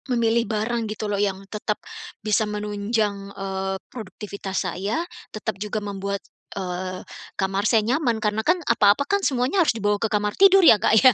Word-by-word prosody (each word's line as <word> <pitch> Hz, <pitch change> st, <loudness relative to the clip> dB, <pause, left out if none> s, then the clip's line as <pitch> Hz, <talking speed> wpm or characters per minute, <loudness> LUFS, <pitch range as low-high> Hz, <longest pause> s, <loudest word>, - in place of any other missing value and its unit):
Memilih 235 Hz, -1 st, +2 dB
barang 225 Hz, +1 st, -1 dB
gitu 215 Hz, 0 st, -4 dB
loh 205 Hz, -1 st, -1 dB
yang 195 Hz, -1 st, -1 dB
tetap, 210 Hz, +1 st, -3 dB, 0.5 s
bisa 215 Hz, 0 st, +2 dB
menunjang, 210 Hz, -1 st, -2 dB
eee, 195 Hz, 0 st, -3 dB
produktivitas 200 Hz, -3 st, -5 dB
saya 200 Hz, -, -2 dB, 0.2 s
tetap 200 Hz, -3 st, -5 dB
juga 210 Hz, 0 st, -2 dB
membuat, 200 Hz, -1 st, -4 dB, 0.3 s
eee, 185 Hz, 0 st, -4 dB, 0.3 s
kamar 195 Hz, +2 st, 0 dB
saya 220 Hz, -3 st, +3 dB
nyaman 245 Hz, -1 st, +1 dB
karena 215 Hz, 0 st, 0 dB
kan 350 Hz, +10 st, +3 dB
apa-apa 210 Hz, +3 st, +4 dB
kan 400 Hz, +7 st, +1 dB
semuanya 265 Hz, +3 st, +1 dB
harus 295 Hz, -8 st, +2 dB
dibawa 205 Hz, -1 st, 0 dB
ke 225 Hz, -, +1 dB
kamar 210 Hz, -1 st, 0 dB
tidur 390 Hz, -1 st, +6 dB
ya 215 Hz, -10 st, +7 dB
Kak 220 Hz, -, +4 dB
ya? 255 Hz, -, +9 dB
210 Hz, 165 wpm, -23 LUFS, 200-230 Hz, 0.5 s, ya